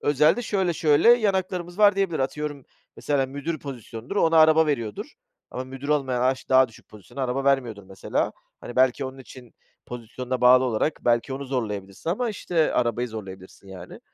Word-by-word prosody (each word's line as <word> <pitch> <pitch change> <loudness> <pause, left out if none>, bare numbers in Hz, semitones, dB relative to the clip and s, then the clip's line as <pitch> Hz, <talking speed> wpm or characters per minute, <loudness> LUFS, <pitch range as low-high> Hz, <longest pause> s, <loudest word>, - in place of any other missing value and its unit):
özel 150 - +3
de, 245 - -3
şöyle, 190 -6 0
şöyle, 150 +4 +3
yan 215 -5 +2
haklarımız 180 -1 -4
var, 205 -2 +5
diyebilir. 190 -5 0
Atıyorum, 145 +1 -3 0.3
mesela 140 -2 0
müdür 145 +4 -5
pozisyonudur, 125 - -8
ona 165 -4 +3
araba 160 0 +6
veriyordur, 145 - -3 0.4
ama 130 - -5
müdür 135 +2 -9
olmayana 130 -4 0
a 130 - +4
işte, 130 - -13
daha 130 -1 +5
düşük 115 - -19
pozisyona 110 +6 -9
araba 130 +2 -2
vermiyordur 125 -7 0
mesela, 95 0 -3 0.3
hani, 120 - -9
belki, 130 +1 +3
onun 130 0 -7
için, 125 -2 -14 0.3
pozisyonuna 125 +1 -6
bağlı 125 +1 +6
olarak, 125 +5 -1
belki 120 +2 +1
onu 140 +1 -5
zorlayabilirsin 105 - -4
ama, 235 +7 -1
işte, 175 -6 0
arabayı 120 0 0
zorlayabilirsin, 95 -3 -10
yani, 90 -2 -11
135 Hz, 175 wpm, -24 LUFS, 120-160 Hz, 0.4 s, araba